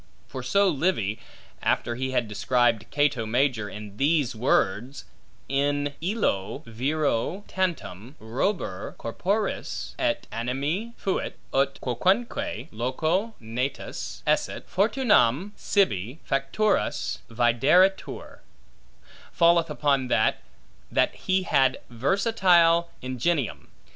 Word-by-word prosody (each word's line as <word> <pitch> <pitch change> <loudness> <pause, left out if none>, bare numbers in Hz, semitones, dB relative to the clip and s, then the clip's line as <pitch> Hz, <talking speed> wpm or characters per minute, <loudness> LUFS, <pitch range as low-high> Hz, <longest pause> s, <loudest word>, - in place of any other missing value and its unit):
For 130 - -6
so 200 +11 +3
Livy 145 - 0 0.4
(after 120 - 0
he 130 +2 -3
had 125 -3 0
described 110 +2 +1
Cato 145 -6 +1
Major 120 -2 +1
in 105 -1 -9
these 145 -3 +2
words, 115 +2 0 0.4
In 145 +1 0
illo 160 - -1
viro 140 - -1
tantum 155 - -3
robur 110 - -2
corporis 200 - -2
et 300 -2 0
animi 145 - -2
fuit, 190 - -2 0.2
ut 135 0 +1
quocunque 155 - 0
loco 160 - -1
natus 125 +4 -4
esset, - - 0
fortunam 200 - +2
sibi 125 - 0
facturus 135 +11 0
videretur) 125 +12 +2 0.9
falleth 170 -2 +4
upon 140 -3 +1
that, - - +2 0.5
that - - +2
he 185 0 0
had 135 -6 +3
versatile 170 - +3
ingenium. 130 +2 -1
140 Hz, 95 wpm, -26 LUFS, 120-180 Hz, 0.9 s, falleth